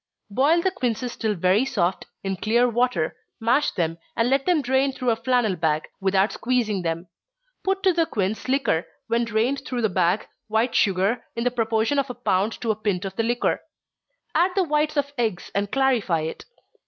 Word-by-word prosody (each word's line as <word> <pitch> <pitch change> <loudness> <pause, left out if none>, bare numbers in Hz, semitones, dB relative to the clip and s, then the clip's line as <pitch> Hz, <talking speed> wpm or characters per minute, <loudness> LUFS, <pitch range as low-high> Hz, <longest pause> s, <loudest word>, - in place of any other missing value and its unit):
Boil 300 +10 +3
the 380 - +2
quinces 245 - -2
till 220 -2 -1
very 185 +5 +3
soft, 195 -9 -1 0.2
in 195 0 -1
clear 235 +6 +2
water, 240 -8 0 0.2
mash 245 +6 +2
them, 165 -1 -2 0.2
and 230 +2 +1
let 275 +3 +2
them 340 -5 +3
drain 265 +2 +2
through 255 -2 0
a - - +2
flannel 230 -3 +1
bag, 155 -2 0 0.2
without 195 +1 +2
squeezing 230 -6 0
them. 165 +1 -3 0.6
Put 390 0 0
to 380 -2 +4
the 330 -1 +2
quince 205 +2 -2
liquor, 265 -11 +1 0.2
when 235 +1 +1
drained 230 +5 0
through 250 -5 -3
the 220 - +3
bag, 180 +2 +1 0.2
white 220 +3 +1
sugar, 200 +4 +2
in 235 - -2
the 250 - +1
proportion 225 +3 +1
of 275 -1 -1
a 250 - -5
pound 215 -3 +1
to 230 - +1
a - - -1
pint 205 -3 -2
of 190 0 -5
the - - +1
liquor. 240 +2 0 0.7
Add 355 +2 +4
the 385 - +3
whites 300 -1 0
of 285 0 0
eggs, 215 -7 -1
and 200 0 -1
clarify 245 -11 +2
it. 160 +1 -5
230 Hz, 190 wpm, -24 LUFS, 195-265 Hz, 0.7 s, to